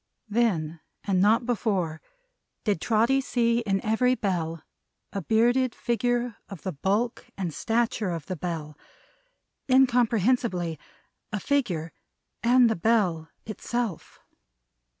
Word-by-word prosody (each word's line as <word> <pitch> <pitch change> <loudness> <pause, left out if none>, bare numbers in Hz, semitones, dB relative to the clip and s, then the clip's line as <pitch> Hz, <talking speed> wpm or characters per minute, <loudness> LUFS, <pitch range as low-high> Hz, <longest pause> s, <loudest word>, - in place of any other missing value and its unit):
Then 175 -8 0 0.2
and 190 -2 +1
not 225 +4 +4
before, 195 -9 -1 0.6
did 205 -7 0
Trotty 235 +4 +3
see 235 -3 +1
in 200 -4 0
every 250 +4 +3
Bell 165 -7 -2 0.5
a 195 - -2
bearded 240 +5 +2
figure 240 0 -1
of 195 -5 -9
the 190 - -2
bulk 200 - -1
and 180 -5 -3
stature 225 -1 0
of 165 -3 -4
the 185 - -4
Bell 160 -3 -5 0.9
incomprehensibly, 235 - +2 0.5
a 210 - -2
figure 190 - -1 0.5
and 245 +1 +5
the 225 - +1
Bell 175 -5 +1 0.2
itself. 225 -2 -4
215 Hz, 110 wpm, -26 LUFS, 175-240 Hz, 0.9 s, and